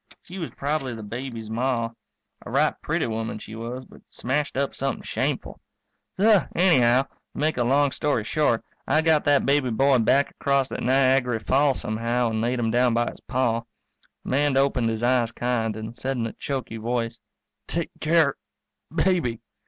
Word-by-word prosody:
She 185 +2 -9
was 165 - -4
probably 140 -3 -2
the 110 - -8
baby's 115 0 -6
Ma; 115 -1 0 0.5
a - - -9
right - - +2
pretty - - 0
woman 110 -1 -3
she 110 - -10
was 120 +3 -6
but - - -17
smashed 140 +3 -2
up 140 0 0
something 135 0 -3
shameful. - - -3 0.6
So 210 -1 +5
anyhow, 130 -8 +5
to - - -24 0.3
make 155 0 0
a 120 - +2
long 140 +3 +3
story 145 -7 0
short, 120 -1 +1 0.2
I 155 - +3
got 160 -2 +3
that 145 -1 +4
baby 140 -2 +2
boy 135 +3 +3
back 135 +5 +3
across 140 -1 0
that - - -5
Niagary 130 -1 +3
falls 140 0 +2
somehow, 115 +2 0
and 110 0 -1
laid 120 +2 0
him 115 -2 0
down 120 0 +3
by 120 0 +1
his - - -16
Pa. 125 -2 +1 0.6
The - - -7
man 140 0 +2
opened 135 -4 +2
his 110 0 -3
eyes 120 -2 +2
kind, 115 -3 -1
and 110 +1 -7
said 135 +2 -3
in 115 - -1
a 115 - -4
choky 130 -5 -4
voice, 115 0 -2 0.5
"Take 170 -1 -2
care 155 -3 +3 0.5
baby." 170 - +1
125 Hz, 175 wpm, -25 LUFS, 115-140 Hz, 0.6 s, So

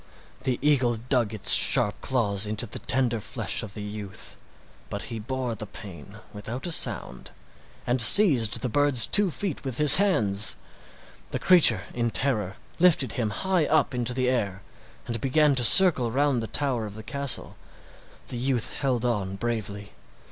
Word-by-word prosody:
The 130 -2 -3
eagle 130 -5 +1
dug 120 -1 -2
its 110 -3 +6
sharp 105 0 +1
claws 105 -6 -2
into 110 +3 -3
the 105 - -7
tender 125 -3 -2
flesh - - -2
of 105 -3 -9
the 105 - -8
youth, 105 -1 -9 0.5
but - - -6
he 115 - -6
bore 125 +2 -5
the 110 -1 -9
pain 100 0 -13 0.2
without 110 +5 -8
a 175 - -4
sound 65 - 0 0.6
and 125 0 +1
seized 125 - +6
the 130 - -3
bird's 140 0 +2
two 205 -1 +3
feet 180 -1 -6
with 130 -4 -5
his 150 -2 +8
hands. 110 - +1 0.7
The - - -4
creature 160 - +4
in 120 -1 -3
terror 110 -7 -2 0.2
lifted 165 -7 +2
him 115 -5 -3
high 180 - -2
up 155 -3 0
into 125 0 -4
the 130 -1 -2
air 100 -6 -3 0.4
and 115 -2 -6
began 150 +2 +1
to 130 -2 0
circle 150 -4 +5
round 135 0 -1
the 110 - -6
tower 130 -6 -3
of 105 - -12
the 110 - -11
castle. 140 +1 -3 0.7
The 125 - -6
youth 125 -1 -2
held 125 -4 -4
on 100 -5 -3
bravely. 105 -2 -6
120 Hz, 165 wpm, -24 LUFS, 105-140 Hz, 0.7 s, his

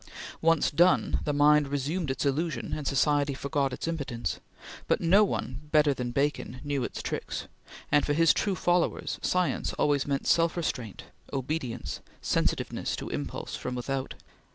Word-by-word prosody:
Once 165 -1 +3
done, 175 +5 +3
the 150 - +1
mind 145 0 +5
resumed 145 +4 -2
its 130 +2 -1
illusion, 155 +4 -1
and 150 -3 -2
society 145 0 +2
forgot 140 0 -1
its 125 - -4
impotence; 140 -8 -3 0.5
but - - +2
no 190 +5 +5
one 150 -7 -3
better 150 -2 +5
than 125 -2 -3
Bacon 140 -1 -1
knew 145 -3 -1
its - - -5
tricks, - - -4 0.5
and 145 - +5
for 145 - +1
his 165 +1 +5
true 200 -3 0
followers 175 -1 0
science 180 -1 0
always 145 -1 +1
meant 140 -1 -1
self 165 0 +3
restraint, 125 - -3 0.3
obedience, 130 -3 -3 0.2
sensitiveness - - -1
to - - -6
impulse - - -4
from 125 - -4
without. 130 +2 -3
145 Hz, 155 wpm, -28 LUFS, 135-165 Hz, 0.5 s, mind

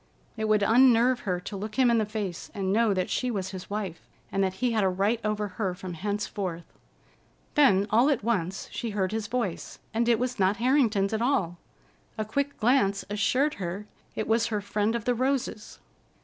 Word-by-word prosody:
It 220 -1 -2
would 215 -1 +3
unnerve 245 +2 +5
her 180 -3 -1
to 200 - -7
look 210 +2 -5
him 255 -2 +4
in 230 - +3
the 215 - 0
face 205 -5 -4
and 195 -1 -1
know 225 0 +3
that 185 -2 0
she 250 - 0
was 195 -6 -3
his 185 -1 -8
wife, 200 -5 -4 0.3
and 195 0 +1
that 190 -1 -1
he 245 +4 0
had 220 -3 +1
a 190 - +3
right 200 +5 +1
over 210 -1 -1
her 185 -1 -3
from 185 -1 -7
henceforth. 195 -2 -3 0.9
Then, 230 -10 +5
all 240 +6 +5
at 275 -7 0
once, 195 -5 -1
she 235 - -4
heard 195 -3 -1
his 220 -1 -2
voice, 235 -8 -3 0.2
and 235 +1 +1
it 235 - +4
was 250 -1 -2
not 190 +2 +3
Harrington's 230 -6 +2
at 220 - 0
all. 200 -10 0 0.6
A 215 - -2
quick 280 +6 -2
glance 220 -4 +2
assured 250 +9 +1
her 185 +4 -4 0.3
it 215 - -2
was 225 +1 +2
her 215 -2 -1
friend 210 +2 -1
of 235 - -3
the 245 - +2
roses. 255 -3 -2
215 Hz, 200 wpm, -27 LUFS, 195-235 Hz, 0.9 s, unnerve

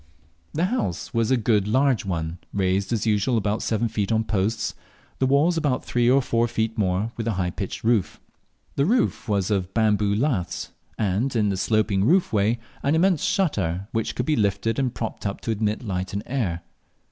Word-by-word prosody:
The 165 +4 +2
house 185 - -2
was 115 -1 +1
a 130 - +4
good 105 -3 +2
large 130 0 +2
one, 85 -2 -3
raised 95 +1 0
as 115 -2 0
usual 110 +3 +2
about 105 0 0
seven 115 +1 0
feet 105 -2 -2
on 110 0 +2
posts, 105 +1 -1 0.5
the 130 - +2
walls 150 +6 +3
about 145 -5 0
three 120 0 +2
or 135 +1 +4
four 115 -1 +1
feet 110 -1 -1
more, 100 +2 0
with 115 -1 -3
a 115 - +1
high 90 -2 -1
pitched 95 +1 -5
roof. 110 -4 +1 0.6
The 140 - +3
floor 245 +4 +3 0.2
was 100 -2 0
of 95 -2 -1
bamboo 105 -2 +2
laths, 105 - -1 0.3
and 110 +6 0
in 105 -3 +2
the 100 - 0
sloping 105 -1 +1
roof 170 - +3
way 105 +3 +2 0.2
an 140 +3 +2
immense 175 -1 +3
shutter, 100 - 0
which 115 -1 -2
could 125 - -1
be 155 - +2
lifted 110 +1 0
and 130 -2 +1
propped 110 -3 -4
up 100 - -4
to 115 - -2
admit 110 +1 -1
light 95 -3 -3
and 100 - -3
air. 100 -11 -2
110 Hz, 195 wpm, -24 LUFS, 100-125 Hz, 0.6 s, a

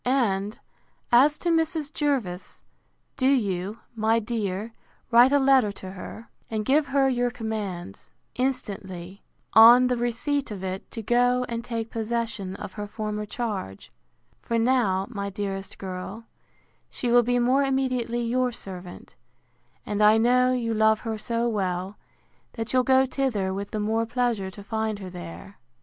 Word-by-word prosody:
And, 215 -6 0 0.5
as 280 +5 +5
to 345 - -2
Mrs. 320 -2 0
Jervis, 250 -12 -2 0.5
do 260 -1 +2
you, 205 -6 0
my 220 +1 +2
dear, 215 -1 -3 0.4
write 240 +3 +7
a 285 - +5
letter 270 -6 +4
to 185 -1 -9
her, 205 +4 -9 0.2
and 215 -1 -2
give 290 +4 +3
her 270 0 +3
your 245 -2 +1
commands, 210 - -5 0.3
instantly, 200 -8 -4 0.3
on, 235 +3 +9
the 250 -1 +1
receipt 245 +4 -1
of 200 -3 -6
it, 190 0 -5
to 225 - -6
go 245 +2 +2
and 235 -1 -4
take 230 -1 -4
possession 225 -4 -3
of 200 -1 -8
her 210 -1 -5
former 210 0 -4
charge; 205 - -5 0.5
for 230 - -1
now, 225 -6 +2
my 200 -4 -4
dearest 195 -1 -5
girl, 190 +4 -6 0.6
she 245 - -2
will 245 0 +7
be 245 +1 +1
more 250 +3 +3
immediately 255 -3 0
your 250 +2 +1
servant; 185 -5 -9 0.7
and 210 0 -2
I 210 +1 +6
know 250 +2 +4
you 235 -3 0
love 220 0 +3
her 220 -2 -4
so 230 +2 -1
well, 190 -3 -2 0.6
that 225 0 -4
you'll 255 - +5
go 260 +1 +4
thither 245 -8 -1
with 200 +1 -4
the 215 - -3
more 225 +2 0
pleasure 235 -5 -1
to 200 +1 -11
find 220 0 -2
her 190 -2 -8
there. 175 +2 -10
225 Hz, 155 wpm, -25 LUFS, 200-250 Hz, 0.7 s, on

